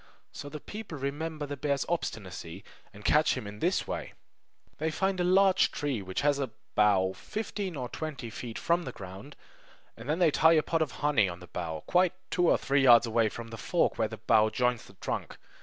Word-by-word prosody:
So 145 - -8
the 150 +1 -7
people 205 -2 -8
remember 150 +3 -3
the 145 0 -5
bear's 140 0 -1
obstinacy, 95 - -4 0.3
and - - -14
catch - - +4
him - - -5
in 105 +1 -8
this - - +1
way: - - -5 0.7
They 160 +1 0
find 190 +3 -1
a - - +2
large 190 +1 +4
tree 140 -7 -2
which 95 -1 -3
has 145 -1 +2
a 135 -3 -1 0.2
bough 95 -3 +3
fifteen 205 - -5
or 125 -3 -3
twenty 140 -4 -6
feet 115 0 -6
from 170 +1 +1
the 130 - -6
ground; 95 +9 -10 0.6
then 140 +8 -2
they 175 -4 +4
tie 160 +3 +5
a 155 -2 +4
pot 165 -1 0
of 155 -5 0
honey 115 -10 +4
on 85 0 -7
the 90 - -11
bough, 80 -3 -5
quite 180 0 +3 0.2
two 175 -1 +3
or - - +5
three 140 +1 +1
yards 120 -3 +7
away 115 -1 +2
from 115 +2 -8
the 115 - -8
fork - - 0
where - - +2
the - - -8
bough 110 0 +3
joins 125 +1 0
the - - -16
trunk. 95 - -4
140 Hz, 205 wpm, -29 LUFS, 110-160 Hz, 0.7 s, yards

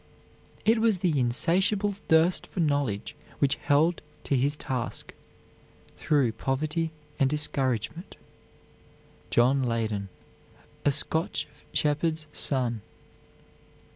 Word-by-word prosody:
It 225 +1 +4
was 220 -3 +3
the 155 -5 +2
insatiable 190 - +2
thirst 160 +3 +3
for - - -7
knowledge 145 -6 0 0.2
which 140 -1 +2
held 160 +4 +2 0.2
to 140 - 0
his 140 +3 +2
task, 125 -5 -4 0.8
through 140 -6 +2
poverty 150 +8 -1 0.3
and 135 - +3
discouragement, 145 - -1 1.1
John 130 +3 +3
Leyden, 110 -5 -1 0.7
a 145 - +4
Scotch 160 +4 0 0.2
shepherd's 155 +1 0
son. 125 -5 0
145 Hz, 95 wpm, -27 LUFS, 125-165 Hz, 1.1 s, It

